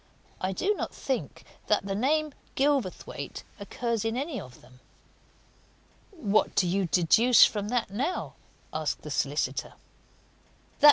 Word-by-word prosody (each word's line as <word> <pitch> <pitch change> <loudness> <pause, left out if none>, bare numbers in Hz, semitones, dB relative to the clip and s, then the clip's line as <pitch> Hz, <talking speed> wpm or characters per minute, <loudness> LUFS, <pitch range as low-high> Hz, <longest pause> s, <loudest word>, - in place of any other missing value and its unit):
I 185 - -1
do 385 - +1
not - - -5
think 265 -2 -3 0.2
that - - +2
name, 280 +10 +1 0.2
Gilverthwaite, 275 -8 -1 0.2
occurs 230 +2 -2
in 225 +1 -1
any 280 0 -3
of 125 -1 -13
them." 125 0 -19 1.3
"What 215 - +1
do 185 - +3
you 190 +1 +1
deduce 220 +9 +6
from 205 -1 -2
that, 240 -5 0
now?" 275 - -2 0.4
asked - - -2
the - - -7
solicitor. - - -1
230 Hz, 120 wpm, -28 LUFS, 195-275 Hz, 1.3 s, deduce